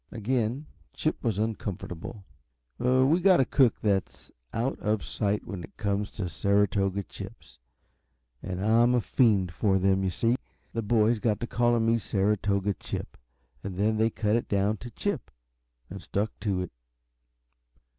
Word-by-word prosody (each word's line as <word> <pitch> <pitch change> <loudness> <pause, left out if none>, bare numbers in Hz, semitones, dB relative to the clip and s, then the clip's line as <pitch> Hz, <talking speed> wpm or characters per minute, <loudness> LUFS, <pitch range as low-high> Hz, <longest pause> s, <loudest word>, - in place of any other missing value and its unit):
Again 120 +4 -1 0.3
Chip 155 - -2
was 115 -6 0
uncomfortable. 105 -2 -4 0.5
"We've 130 +7 +3
got 185 -1 +6
a 135 - +4
cook 130 -1 +3
that 100 -3 +1
is - - -20 0.2
out 120 +4 -1
of 105 -1 0
sight 105 -1 -1
when 95 -5 -6
it - - -13
comes 100 0 -1
to 100 -4 -3
Saratoga 100 +1 +1
chips, - - -11 0.8
and 95 +1 -4
I'm 120 +3 +4
a - - +4
fiend 105 -7 +2
for 95 +2 +2
them, 95 0 +2
you 95 - +1
see. 115 +7 +1 0.4
The 115 - -1
boys 110 +1 +2
got 105 -1 0
to - - 0
calling 120 -1 +2
me 115 +1 +3
Saratoga 100 -1 +1
Chip, - - -6 0.5
and 95 -2 -5
then 110 +2 +2
they 110 +1 +3
cut 105 -1 0
it 120 - -1
down 100 +2 +1
to 120 - -9
Chip - - -3 0.6
and 95 +1 -8
stuck 105 +4 -1
to 100 -3 -1
it." 90 - -5
105 Hz, 155 wpm, -28 LUFS, 100-115 Hz, 0.8 s, got